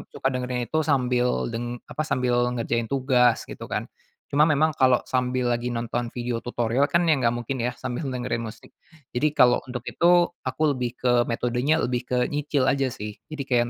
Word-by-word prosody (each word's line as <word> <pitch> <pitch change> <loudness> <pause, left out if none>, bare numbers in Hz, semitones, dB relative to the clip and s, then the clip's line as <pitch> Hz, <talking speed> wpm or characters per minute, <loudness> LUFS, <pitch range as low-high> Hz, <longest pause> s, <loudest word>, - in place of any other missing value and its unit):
sangat - - -13
suka 135 - 0
dengerin 125 -1 -2
itu 160 +6 -1
sambil 125 -4 +2 0.2
deng 120 +1 -4
apa, - - -7
sambil 120 -1 +1
ngerjain 115 -1 -1
tugas, 125 -3 +2
gitu - - -9
kan. - - -2 0.5
Cuma 145 +1 +4
memang 155 +1 +3
kalau 130 -2 +4
sambil 125 -1 0
lagi 120 +1 -3
nonton 120 0 -3
video 120 -1 -3
tutorial 120 +4 0
kan 170 +1 +3
ya 160 - +5
nggak 125 -4 +2
mungkin 120 +1 -3
ya 125 - +1
sambil 130 +3 -4
dengerin 125 -2 -2
musik. 110 -2 -10 0.4
Jadi 150 +5 +2
kalau 125 -1 +5
untuk 125 -1 -6
itu, 170 +1 +2 0.3
aku 130 +4 -3
lebih 125 -1 -4
ke 125 -1 +2 0.2
metodenya 125 +6 +1
lebih 125 -3 -1
ke 125 - +2
nyicil 145 -2 0
aja 135 -2 +1
sih. 105 -2 -6 0.2
Jadi 150 -2 -4
kayak 125 -3 +2
125 Hz, 190 wpm, -25 LUFS, 120-135 Hz, 0.5 s, ya